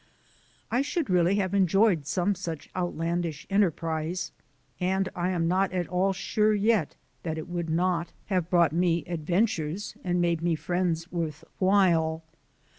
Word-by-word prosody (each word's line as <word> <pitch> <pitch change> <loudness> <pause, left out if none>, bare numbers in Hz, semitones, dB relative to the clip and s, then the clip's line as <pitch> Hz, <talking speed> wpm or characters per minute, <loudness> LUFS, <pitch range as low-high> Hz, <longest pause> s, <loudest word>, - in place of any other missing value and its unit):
I 245 +3 +2
should 280 - -2
really 180 +1 +3
have 195 -2 0
enjoyed 195 -4 +3
some 185 +4 +1
such 170 -5 -6
outlandish 170 -3 -2
enterprise, 170 -2 0 0.5
and 190 +1 +1
I 175 +1 0
am 170 -3 0
not 190 +2 +2
at 180 -2 -1
all 185 +2 +2
sure 210 +3 +1
yet 210 -5 +1 0.3
that 160 -2 -3
it 155 - -5
would 175 -2 -3
not 170 +1 0
have 180 -4 -1
brought 170 -4 +4
me 170 -2 +1
adventures 175 +1 -1
and 180 -1 0
made 170 -2 +1
me 170 -1 +1
friends 175 0 -1
worth 160 -4 -3 0.2
while. 170 -5 +3
175 Hz, 145 wpm, -27 LUFS, 165-190 Hz, 0.5 s, brought